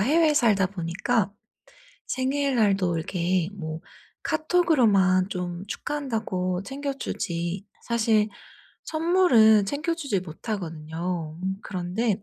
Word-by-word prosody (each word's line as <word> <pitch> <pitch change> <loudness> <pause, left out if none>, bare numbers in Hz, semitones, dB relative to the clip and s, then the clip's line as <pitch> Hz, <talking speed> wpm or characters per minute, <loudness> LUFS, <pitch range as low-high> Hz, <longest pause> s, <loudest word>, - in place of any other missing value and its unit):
해외에 305 +7 +4
살다 210 -9 +4
보니까 195 +4 -1 0.7
생일날도 245 -10 +1
이렇게 175 +1 0
뭐 160 -4 -5 0.4
카톡으로만 245 - +3
좀 180 -1 -4
축하한다고 220 -9 -2
챙겨 275 +5 -4
주지 175 -6 -3 0.2
사실 220 -2 +2 0.6
선물은 315 - +5
챙겨 300 - -1
주지 280 - -1
못하거든요. 165 -3 -5
음 190 +1 -1
그런데 195 +3 -2
200 Hz, 240 characters per minute, -25 LUFS, 180-265 Hz, 0.7 s, 선물은